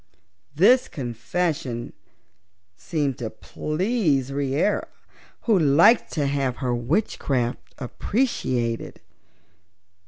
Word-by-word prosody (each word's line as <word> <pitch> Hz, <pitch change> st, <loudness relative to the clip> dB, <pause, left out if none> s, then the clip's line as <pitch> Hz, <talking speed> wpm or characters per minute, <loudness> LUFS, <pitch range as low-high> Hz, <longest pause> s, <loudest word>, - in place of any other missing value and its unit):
This 245 Hz, -, +5 dB
confession 125 Hz, 0 st, -3 dB, 0.8 s
seemed 145 Hz, -, -2 dB
to 115 Hz, -3 st, -3 dB
please 155 Hz, -, -1 dB
Reera, 140 Hz, +7 st, 0 dB, 0.5 s
who 220 Hz, -5 st, +3 dB
liked 165 Hz, -, +5 dB
to 150 Hz, -3 st, 0 dB
have 140 Hz, -2 st, 0 dB
her 125 Hz, -2 st, -1 dB
witchcraft 125 Hz, -, -1 dB
appreciated. 125 Hz, -, -2 dB
140 Hz, 75 wpm, -24 LUFS, 125-180 Hz, 0.8 s, This